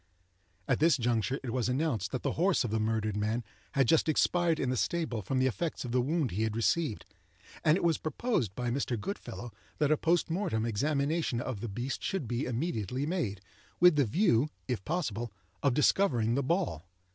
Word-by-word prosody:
At - - +2
this 160 -1 +4
juncture, 120 +1 0
it 125 - -3
was 125 -2 0
announced 125 - 0
that 130 - -3
the - - +1
horse 180 -1 +2
of 120 - -3
the 110 - +1
murdered 110 -1 0
man 110 +3 -1 0.3
had 135 -3 +3
just 160 +2 +4
expired 170 +1 +2
in 130 - 0
the - - 0
stable 140 -4 -1
from 130 +7 -2
the 130 - +3
effects 140 +4 -2
of 120 - -4
the 125 +1 +3
wound 150 0 0
he 100 - -2
had 110 -1 0
received, 115 +1 0 0.6
and 155 +2 +5
it - - -3
was 170 -2 +2
proposed 155 - -1
by 125 -1 -2
Mr. 125 -3 -1
Goodfellow 120 - -6 0.3
that 150 -1 +2
a 155 - +4
post 170 +3 +2
mortem 165 - 0
examination 140 +4 0
of 120 -3 -4
the 115 - -4
beast 120 +7 -4
should 190 -10 -2
be 120 +4 -1
immediately 125 - -2
made, 135 - -2 0.4
with 180 -2 +7
the 145 - +4
view, 140 - +2 0.2
if 125 -7 -2
possible, 120 - -2 0.3
of 135 -3 +2
discovering 125 - +3
the 140 - +1
ball. 140 - -1
130 Hz, 195 wpm, -30 LUFS, 115-160 Hz, 0.6 s, with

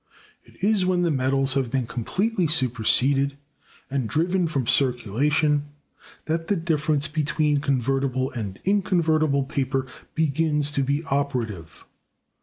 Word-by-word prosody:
It - - -20
is 205 -2 +3
when 180 -1 +1
the 170 - +2
metals 135 0 +1
have 135 -3 0
been 130 0 -1
completely 185 - -1
superseded 135 0 +1 0.5
and 135 -4 -2
driven 175 - +1
from 140 -6 -1
circulation 145 +5 +1 0.6
that 165 +1 -2
the 205 - +2
difference 155 -3 0
between 150 -1 0
convertible 135 -1 0
and 105 -6 -5
inconvertible 160 -7 +2
paper 135 0 -1 0.3
begins 150 -1 +1
to 140 - 0
be 140 +3 0
operative. 125 - -3
140 Hz, 120 wpm, -24 LUFS, 130-160 Hz, 0.6 s, is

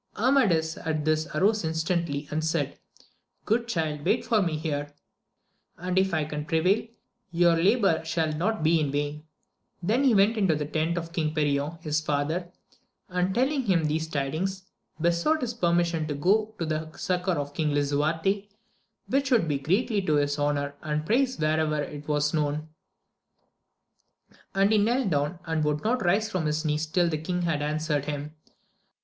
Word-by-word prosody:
Amadis 205 -11 +2
at 155 -1 -2
this 155 0 +1
arose 210 +2 +2
instantly, 160 -2 -1
and 155 +1 -1
said, 160 - -1 0.7
Good 235 +2 +1
child, 155 -8 -2
wait 235 +9 +1
for 230 -2 +3
me 170 -5 0
here, 145 -2 -3 0.8
and 180 +2 0
if 190 0 +1
I 160 -2 +1
can 150 0 -5
prevail 180 +8 +2 0.4
your 170 -1 +4
labour 190 -1 +3
shall 160 -1 -1
not 180 +5 -1
be 160 +1 +4
in 145 -3 0
vain: 145 +2 -3 0.6
then 225 +9 +2
he 255 -5 +4
went 200 +3 +5
to 160 - +3
the 150 0 -2
tent 160 +3 -1
of 165 0 -5
King 155 -2 -1
Perion 145 +1 0
his 150 0 0
father, 155 +4 -1 0.6
and 180 +1 0
telling 265 +1 +1
him 180 -6 +2
these 155 +1 -1
tidings, 160 +7 -2 0.4
besought 170 - +2
his 245 -2 -2
permission 170 -5 +1
to 145 - -3
go 210 +8 +1
to 165 - -2
the 155 0 -3
succour 180 0 0
of 145 -1 -4
King 155 0 0
Lisuarte, 160 +8 0 0.6
which 275 0 0
would 235 -10 +3
be 145 -2 0
greatly 200 - +1
to 155 -5 +1
his 145 0 +1
honour 145 -1 0
and 150 0 -2
praise 255 +6 +1
wherever 155 -1 +1
it 145 0 -6
was 150 -1 +1
known; 155 0 -1 1.9
and 195 +2 +3
he 215 - +4
knelt 235 0 +1
down, 145 +3 0
and 160 -2 0
would 150 0 0
not 245 +3 +1
rise 200 +5 +2
from 185 -7 -2
his 155 +2 -1
knees 150 +1 0
tUl 175 +2 +2
the 155 -2 -1
king 180 +3 -2
had 165 -4 0
answered 150 -1 -1
him. 150 0 -4
160 Hz, 170 wpm, -27 LUFS, 150-190 Hz, 1.9 s, went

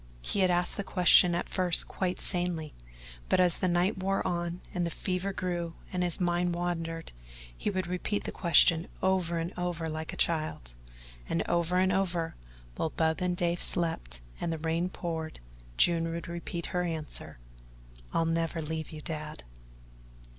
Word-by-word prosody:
He - - -1
had 185 -1 +4
asked 175 0 +3
the 200 - -1
question 180 -2 +6
at 175 - -1
first 180 -3 +5
quite 185 -1 -2
sanely, 175 -5 -2 0.6
but - - +3
as 180 -2 +4
the 185 - +1
night 180 +3 +2
wore 195 +1 0
on 175 -1 -2
and 175 - 0
the 170 - 0
fever 185 +3 -2
grew 175 -3 -3 0.2
and 180 - 0
his 175 0 +1
mind 175 -1 +1
wandered, 165 -2 -3 0.4
he - - -2
would 185 -2 -1
repeat 180 +4 -2
the - - -4
question 170 0 +4 0.2
over 185 -3 +2
and 165 +2 -3
over 175 -2 -2
like 160 0 -4
a - - -8
child, 155 - 0 0.6
and 85 - 0
over 175 +1 +1
and 185 0 +3
over, 175 -3 0 0.4
while 160 - 0
Bub 160 +2 0
and 180 -1 0
Dave 175 -1 0
slept - - 0 0.2
and 170 - -1
the 160 - -2
rain 165 +3 0
poured, 160 -3 -4 0.4
June 165 -1 +4
would 170 +1 -4
repeat 170 0 -5
her 180 - +2
answer: 160 - -5 0.7
"I'll 165 - +1
never 165 0 0
leave 160 0 -4
you, 155 -1 -8
Dad." 155 -1 -5
175 Hz, 170 wpm, -30 LUFS, 165-180 Hz, 0.7 s, question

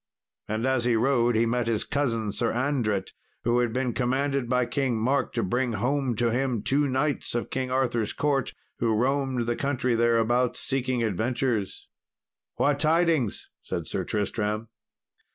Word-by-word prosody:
And 110 +3 -2
as 130 -2 +1
he 120 -1 +3
rode, 120 0 +2
he 115 +1 +3
met 120 0 0
his 115 -2 0
cousin 115 -7 -1
Sir 115 +3 0
Andret, 120 -6 0 0.3
who 120 +1 +2
had 120 -2 +1
been 125 0 -1
commanded 135 0 0
by 125 -1 +2
King 120 0 -1
Mark 130 +5 +1
to 115 - 0
bring 120 +5 0
home 125 +3 0
to 115 +1 +1
him 125 -3 0
two 145 +2 +2
knights 135 -1 -1
of 120 - -2
King 130 -1 -2
Arthur's 120 -4 0
court 140 -3 0 0.2
who 115 -2 +2
roamed 130 +1 0
the 120 0 0
country 130 -3 0
thereabouts 120 +1 +2
seeking 130 -2 0
adventures. 115 0 -1 0.7
"What 145 0 +1
tidings?" 160 - +1
said - - -4
Sir - - -2
Tristram. 105 +1 -2
125 Hz, 155 wpm, -26 LUFS, 115-135 Hz, 0.7 s, he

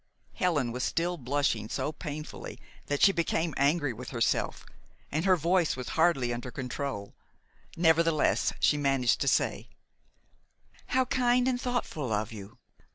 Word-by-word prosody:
Helen 150 -10 0
was 125 +2 -4
still 175 +1 0
blushing 130 -6 -1
so 150 - -2
painfully 155 -1 -7 0.3
that 145 0 0
she 200 - +8
became 165 -2 -1
angry 145 -1 +2
with 125 +2 -8
herself, 115 -3 -1 0.5
and 155 +5 -1
her 190 -1 +5
voice 170 0 +1
was 125 -1 -6
hardly 140 -8 +2
under 120 +1 -5
control. 125 -4 -5 0.6
Nevertheless, 165 -1 +3
she 150 - +3
managed 135 -4 +2
to - - 0
say: - - +1 1.2
"How 260 0 +2
kind 250 0 +2
and 250 -1 0
thoughtful 200 - -2
of 110 +1 -1
you! 105 +3 -10
145 Hz, 140 wpm, -29 LUFS, 125-170 Hz, 1.2 s, she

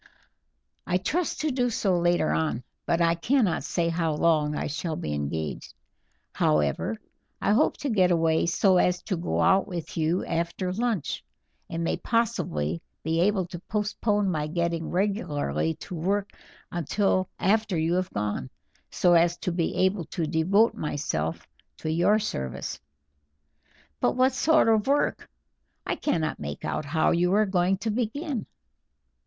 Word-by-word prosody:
"I 180 - +2
trust 310 - -1
to 310 -1 0
do 250 -1 +1
so 200 -4 +1
later 175 -2 +2
on, 155 -6 -1 0.2
but 170 0 +2
I 165 0 +4
cannot 215 +3 +1
say 170 -2 0
how 165 -2 0
long 150 -2 +2
I - - -2
shall 155 +2 -3
be 75 - -4
engaged. 75 +2 -4 0.6
However, 75 - +1 0.4
I - - +1
hope 215 - +3
to 285 - -3
get 185 -4 +4
away 165 -1 +2
so 185 +2 +3
as 180 0 +2
to 190 - -2
go 170 +1 -1
out 190 0 +4
with 170 -3 -6
you 165 +3 +1
after 170 +2 -2
lunch, 225 - -1 0.5
and 165 0 -3
may - - 0
possibly 85 - -1 0.2
be 160 +2 +1
able 195 0 +2
to 175 0 -8
postpone 210 0 0
my 150 -3 -1
getting 170 0 -1
regularly 150 - -1
to - - -9
work 195 +4 -1 0.4
until 185 +3 0
after 210 -1 +1
you 160 +2 +1
have 185 0 0
gone, 105 -11 -3 0.4
so 175 - +3
as 170 0 +4
to 180 - -2
be 170 -1 -1
able 190 -2 0
to 160 +2 -3
devote 180 +8 +3
myself 80 - -3 0.3
to 155 - -3
your 175 +6 +3
service." 65 - -4 1.2
"But - - +2
what 255 +1 +3
sort 315 +2 +3
of 220 0 +3
work? 285 +1 +1 0.6
I - - -1
cannot 160 - -1
make 75 0 -6
out - - -2
how 155 +2 +2
you 175 +1 +2
are 215 +1 +4
going 190 -1 +1
to 220 +3 -2
begin." 250 +4 -2
175 Hz, 155 wpm, -26 LUFS, 160-205 Hz, 1.2 s, I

